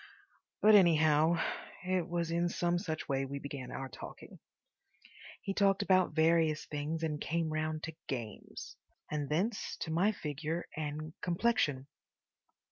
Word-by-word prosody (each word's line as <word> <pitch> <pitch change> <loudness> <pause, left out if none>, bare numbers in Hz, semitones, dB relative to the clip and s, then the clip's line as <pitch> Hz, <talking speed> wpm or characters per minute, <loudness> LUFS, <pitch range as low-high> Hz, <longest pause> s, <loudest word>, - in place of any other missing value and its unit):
But, 215 +1 +8
anyhow, 160 -4 +6 0.5
it 185 -1 0
was 170 -1 -1
in 170 +1 +1
some 175 0 +1
such 160 -3 -4
way 135 -1 0
we 135 +1 -4
began 140 -2 -6
our 135 - -5
talking. - - -10 1.0
He 195 - -2
talked 195 0 +3
about 185 -5 +3
various 160 -1 +3
things 155 +2 -3
and 150 -2 -1
came 165 -1 -1
round 155 0 -2
to 160 - -4
games. 115 -6 -6 0.3
And 150 -2 -2
thence 195 +8 -1
to 160 - -2
my 180 +6 +3
figure 160 -1 -3
and 155 0 -4
complexion. 170 - +1
160 Hz, 135 wpm, -33 LUFS, 150-175 Hz, 1.0 s, But